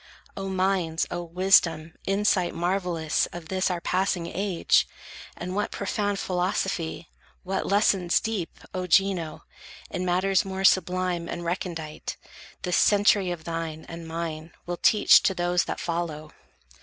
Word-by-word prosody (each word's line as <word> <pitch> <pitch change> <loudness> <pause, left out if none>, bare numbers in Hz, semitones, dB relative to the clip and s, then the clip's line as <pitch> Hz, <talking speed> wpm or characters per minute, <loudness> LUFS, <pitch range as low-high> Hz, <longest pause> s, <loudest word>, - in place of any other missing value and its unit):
O 195 0 -4
minds, 185 -3 0
O 175 - -2
wisdom, 170 -2 +3
insight 195 -2 +1
marvellous 175 -3 0
Of 170 -2 -10
this 190 0 +1
our 180 -1 -1
passing 185 0 0
age! 185 +1 +1 0.5
And 180 +1 -5
what 210 - 0
profound 205 0 -2
Philosophy, 180 -3 -2 0.4
what 190 +1 -2
lessons 195 -3 +3
deep, 215 -7 -4
O 185 -1 -3
Gino, 180 -3 +1 0.5
In 180 - -3
matters 185 +1 +2
more 190 -1 -4
sublime 180 -2 +2
and 175 0 -5
recondite, 170 -3 -4 0.5
This 180 - +1
century 205 -2 +4
of 175 -3 -4
thine 165 -1 -4
and 165 0 -8
mine 160 -1 -5
will 175 0 -3
teach 210 +3 +6
To 190 - +1
those 175 0 +1
that - - -4
follow! 165 -3 -3
180 Hz, 135 wpm, -26 LUFS, 170-190 Hz, 0.5 s, teach